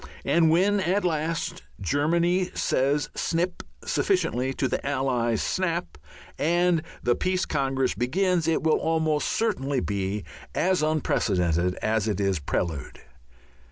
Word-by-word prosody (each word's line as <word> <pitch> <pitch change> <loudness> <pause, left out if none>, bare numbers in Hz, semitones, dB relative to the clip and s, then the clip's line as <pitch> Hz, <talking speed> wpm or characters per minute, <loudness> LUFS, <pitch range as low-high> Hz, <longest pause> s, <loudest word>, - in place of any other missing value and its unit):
And 165 -1 +4
when 195 +5 +3
at 190 +2 +1
last 160 -1 -1 0.2
Germany 170 - +1
says 145 +2 +1
snip 175 +2 -1 0.2
sufficiently 135 - +1
to 135 - 0
the 125 - -2
Allies' 130 -5 0
snap, 175 -2 -1 0.4
and 170 +2 +2 0.2
the 120 - +3
Peace 185 0 0
Congress 135 -2 0
begins, 170 - +1
it 165 -2 +1
will 160 -1 +3
almost 160 -2 +1
certainly 145 - 0
be 100 -1 -2 0.3
as 185 -1 +2
unprecedented 90 - +1
as 110 -1 +1
its 100 -4 0
prelude. 75 -1 -3
150 Hz, 120 wpm, -26 LUFS, 120-175 Hz, 0.4 s, And